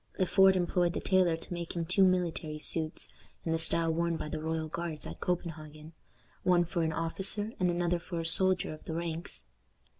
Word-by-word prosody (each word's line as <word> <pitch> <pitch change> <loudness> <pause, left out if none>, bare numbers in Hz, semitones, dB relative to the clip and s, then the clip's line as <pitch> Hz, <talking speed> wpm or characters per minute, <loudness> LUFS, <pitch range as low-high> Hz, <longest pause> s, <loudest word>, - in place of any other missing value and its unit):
Le 185 - +2
Fort 190 +1 +5
employed 175 -1 +1
the - - -2
tailor 185 -3 +2
to 165 - -8
make 170 0 -5
him 170 -1 -1
two 185 +3 +3
military 175 -4 +1
suits, 155 +1 -2 0.3
in 165 - -1
the 165 - +1
style 165 0 +2
worn 170 0 0
by - - -5
the 155 +1 -4
royal 160 0 -2
guards 165 -1 -5
at - - -8
Copenhagen 155 -3 -4 0.5
one 175 -1 +3
for 170 0 -2
an 160 -1 +1
officer, 195 +6 -1
and 180 -1 +2
another 175 0 0
for 170 0 -5
a 165 - -3
soldier 185 +1 +4
of 155 - -13
the 160 - -4
ranks. 170 0 -4
170 Hz, 200 wpm, -31 LUFS, 160-180 Hz, 0.5 s, Fort